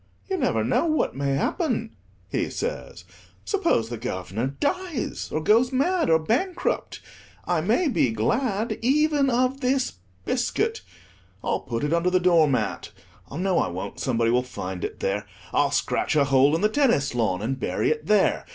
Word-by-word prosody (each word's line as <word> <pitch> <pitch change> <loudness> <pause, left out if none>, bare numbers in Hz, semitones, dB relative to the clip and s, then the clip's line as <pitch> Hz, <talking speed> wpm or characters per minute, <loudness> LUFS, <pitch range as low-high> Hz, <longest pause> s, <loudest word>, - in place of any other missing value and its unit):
"You 385 - -1
never - - +1
know - - +1
what 310 -1 0
may 140 0 0
happen," 230 - -1 0.3
he - - -1
says; - - -5 0.4
"suppose 340 - +1
the 120 -2 -5
Guv'nor 95 +7 -3
dies, 355 -3 -2
or 155 - -2
goes 230 - +4
mad, 335 - +1
or 160 - +6
bankrupt, 245 - -1 0.4
I 175 -3 +1
may 230 - +2
be 240 - +2
glad 205 - -1
even 290 +2 +3
of 255 +2 +1
this 255 - 0 0.3
biscuit; 435 - -1 0.6
I'll - - 0
put 115 +1 -4
it 150 +2 0
under 170 +1 +2
the 185 0 +3
door 170 -3 +4
mat—no, 145 - -3
I - - +1
won't, 95 +3 -6
somebody 115 -3 +1
will 125 +1 +3
find 95 -8 -6
it - - -5
there. 105 +2 -1 0.3
I'll - - +3
scratch - - 0
a 145 - +5
hole 140 +2 +4
in 165 - -1
the 210 - +3
tennis 230 - +2
lawn, 110 -5 0
and 130 +4 -2
bury 105 +3 0
it 155 0 -3
there. 210 -2 +2
180 Hz, 165 wpm, -25 LUFS, -, 0.6 s, or